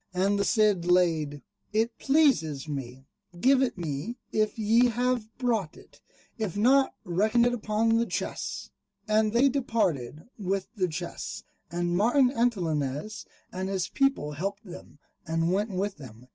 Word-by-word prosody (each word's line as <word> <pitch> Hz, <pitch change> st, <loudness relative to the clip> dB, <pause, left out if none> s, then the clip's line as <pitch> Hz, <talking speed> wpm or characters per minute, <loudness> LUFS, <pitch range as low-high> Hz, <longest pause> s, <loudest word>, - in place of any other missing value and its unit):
And 200 Hz, +2 st, +2 dB
the -, -, +2 dB
Cid 210 Hz, -5 st, +2 dB
laid, 165 Hz, -5 st, +2 dB, 0.3 s
"It 225 Hz, +2 st, 0 dB
pleases 260 Hz, -, +2 dB
me: 135 Hz, -3 st, -6 dB, 0.3 s
give 265 Hz, +5 st, +4 dB
it 260 Hz, -, 0 dB
me 165 Hz, -, -4 dB
if 215 Hz, 0 st, 0 dB
ye 225 Hz, +3 st, +4 dB
have 245 Hz, -1 st, -1 dB
brought 230 Hz, -10 st, -1 dB
it; -, -, -18 dB, 0.4 s
if 205 Hz, -4 st, -3 dB
not, 265 Hz, +5 st, +4 dB
reckon 215 Hz, +7 st, +2 dB
it 245 Hz, -, +2 dB
upon 225 Hz, 0 st, +1 dB
the 235 Hz, 0 st, +1 dB
chests." -, -, -4 dB, 0.4 s
And 215 Hz, 0 st, +2 dB
they 240 Hz, +5 st, +4 dB
departed 175 Hz, -, -1 dB, 0.2 s
with 195 Hz, 0 st, -2 dB
the 185 Hz, -4 st, +1 dB
chests, 175 Hz, +1 st, -6 dB, 0.3 s
and 175 Hz, +1 st, -1 dB
Martin 245 Hz, +6 st, +4 dB
Antolinez 180 Hz, -, -1 dB, 0.2 s
and 190 Hz, +1 st, -4 dB
his 190 Hz, -2 st, -2 dB
people 275 Hz, -, +1 dB
helped 195 Hz, +8 st, -4 dB
them, 180 Hz, -4 st, -11 dB, 0.3 s
and 165 Hz, +2 st, 0 dB
went 205 Hz, +3 st, 0 dB
with 195 Hz, +1 st, -2 dB
them. 125 Hz, -4 st, -12 dB
200 Hz, 145 wpm, -27 LUFS, 170-230 Hz, 0.4 s, give